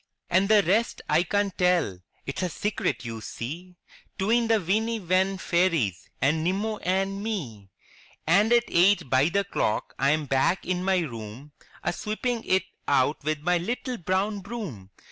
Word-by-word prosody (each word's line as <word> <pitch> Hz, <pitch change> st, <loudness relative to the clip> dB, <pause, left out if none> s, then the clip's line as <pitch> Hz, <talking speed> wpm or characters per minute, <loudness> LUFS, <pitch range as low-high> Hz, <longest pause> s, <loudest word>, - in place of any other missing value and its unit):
And 190 Hz, +3 st, +3 dB
the 210 Hz, -2 st, +6 dB
rest 215 Hz, +6 st, +1 dB
I 155 Hz, +2 st, +3 dB
can't 200 Hz, +2 st, 0 dB
tell 180 Hz, -, +1 dB
— -, -, -39 dB
it's 140 Hz, -, -4 dB
a 180 Hz, -, 0 dB
Secret, 200 Hz, -7 st, -2 dB
you 115 Hz, -1 st, -5 dB
see, 165 Hz, -, -7 dB, 0.4 s
'Tween 230 Hz, +4 st, +2 dB
the 225 Hz, -1 st, +3 dB
Weeny 220 Hz, +5 st, 0 dB
Wen 190 Hz, +1 st, +1 dB
Fairies, 165 Hz, -, 0 dB
and 155 Hz, +4 st, +1 dB
Nimmo 205 Hz, +5 st, -1 dB
and 195 Hz, +1 st, -1 dB
me! 130 Hz, -, -5 dB, 0.6 s
And 200 Hz, +7 st, +4 dB
at 240 Hz, -1 st, +5 dB
eight 180 Hz, -4 st, +3 dB
by 135 Hz, +4 st, +4 dB
the 200 Hz, +3 st, +1 dB
clock 180 Hz, -, -1 dB
I 140 Hz, -, +3 dB
am 155 Hz, 0 st, +1 dB
back 140 Hz, +7 st, +1 dB
in 180 Hz, 0 st, -1 dB
my 190 Hz, -1 st, +2 dB
room, 120 Hz, 0 st, -7 dB, 0.3 s
A 175 Hz, -, 0 dB
sweeping 225 Hz, +4 st, -2 dB
it 185 Hz, -1 st, +2 dB, 0.2 s
out 140 Hz, +2 st, +2 dB
with 155 Hz, 0 st, -1 dB
my 175 Hz, +2 st, +2 dB
little 245 Hz, +6 st, -3 dB
brown 190 Hz, +4 st, 0 dB
broom! 180 Hz, -, -7 dB
180 Hz, 165 wpm, -26 LUFS, 150-205 Hz, 0.6 s, the